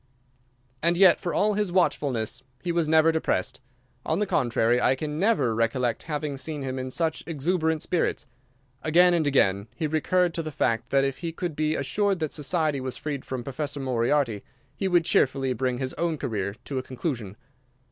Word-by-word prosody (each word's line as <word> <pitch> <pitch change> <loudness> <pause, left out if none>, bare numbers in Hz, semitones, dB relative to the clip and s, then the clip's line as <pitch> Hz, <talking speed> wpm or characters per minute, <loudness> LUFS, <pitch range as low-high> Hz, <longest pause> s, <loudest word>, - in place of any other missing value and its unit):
And 170 +1 +2
yet 185 -2 +6
for 175 - -3
all 210 0 +2
his 205 -2 -1
watchfulness 130 - 0 0.2
he 175 - -1
was 170 -2 0
never 160 0 +5
depressed. 155 - -1 0.4
On 160 - 0
the 210 - +1
contrary, 120 - +2
I 130 - +3
can 150 +2 -4
never 200 - +2
recollect 115 +1 0
having 150 -2 -2
seen 145 +1 -4
him 130 0 -3
in 130 0 -4
such 160 +3 -1
exuberant 160 0 0
spirits. 170 -3 -1 0.6
Again 175 +3 +5
and 160 -4 +1
again 100 -7 +2
he 165 - -2
recurred 170 +3 +1
to 170 - -2
the 155 - -5
fact 120 -4 -1
that 135 0 +3
if 135 -1 -2
he 170 -1 -3
could 165 -1 -4
be 155 +1 0
assured 200 +8 0
that 155 -3 -3
society 150 -2 0
was 130 -1 -4
freed 145 -3 -4
from 130 -2 -4
Professor 140 +2 -4
Moriarty 125 -3 0 0.3
he 195 - -1
would 175 -2 +3
cheerfully 135 -4 +2
bring 125 0 -1
his 130 0 -3
own 165 -2 0
career 105 -8 -3
to 135 -2 -2
a - - -2
conclusion. 125 - -5
150 Hz, 185 wpm, -26 LUFS, 130-165 Hz, 0.6 s, yet